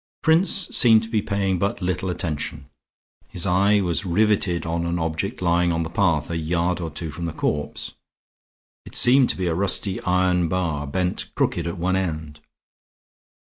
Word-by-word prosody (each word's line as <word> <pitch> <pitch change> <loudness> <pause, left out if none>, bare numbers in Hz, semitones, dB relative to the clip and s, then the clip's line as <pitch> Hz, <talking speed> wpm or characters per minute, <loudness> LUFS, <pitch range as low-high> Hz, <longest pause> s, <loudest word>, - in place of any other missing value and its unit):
Prince 165 +4 +4 0.2
seemed 110 -2 +6
to 110 - -8
be 110 -2 0
paying 95 -2 -1
but 100 +3 -1
little 90 0 -2
attention; 75 -4 -4 0.6
his 90 - -2
eye 100 +3 +3
was 90 -2 -1
riveted 95 -2 +1
on 85 +1 -2
an 85 +1 -1
object 80 +6 -3
lying 85 0 +2
on 85 0 -1
the 80 - -6
path 85 -4 +1
a 85 - -2
yard 85 +2 -1
or 85 - -3
two 80 0 -5
from 85 +3 -6
the 85 - -3
corpse. 75 -1 -3 0.9
It - - -12
seemed 130 +1 +5
to - - 0
be 95 - -2
a 85 - 0
rusty 95 +1 0
iron 90 -1 +1
bar 80 -5 -2
bent 90 +5 -2
crooked - - 0
at 85 - -4
one 90 +2 0
end. 80 -5 -3
90 Hz, 175 wpm, -23 LUFS, 85-95 Hz, 0.9 s, seemed